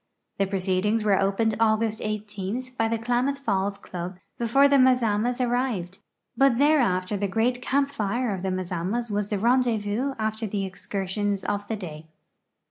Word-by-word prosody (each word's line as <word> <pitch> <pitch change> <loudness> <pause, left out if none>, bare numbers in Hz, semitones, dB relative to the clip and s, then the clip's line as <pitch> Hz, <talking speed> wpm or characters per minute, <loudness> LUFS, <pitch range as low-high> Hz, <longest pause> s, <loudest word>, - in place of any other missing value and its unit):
The 195 - +2
proceedings 195 +3 0
were 200 -3 +3
opened 200 +3 +1
August 220 -1 +2
IS 215 +3 -4
by 225 -3 0
the 230 0 0
Klamath 245 +4 0
Falls 200 -6 -1
club 180 -2 -7 0.2
before 240 +4 +4
the 280 0 +4
Mazamas 245 -2 +3
arrived, 240 -7 -1 0.4
but 270 -3 +4
thereafter 240 -10 +3
the 200 +1 -1
great 235 +5 0
camp 275 +2 +1
tire 235 -2 -1
of 190 - -4
the 190 - -1
Mazamas 185 +5 -2
wa.s 205 0 -1
the 210 - -1
rendezvous 235 +2 +1
after 220 0 -2
the 200 -1 -2
excursions 195 +1 -3
of 205 0 -2
the 220 - -2
day. 160 -6 -8
215 Hz, 155 wpm, -25 LUFS, 195-245 Hz, 0.4 s, before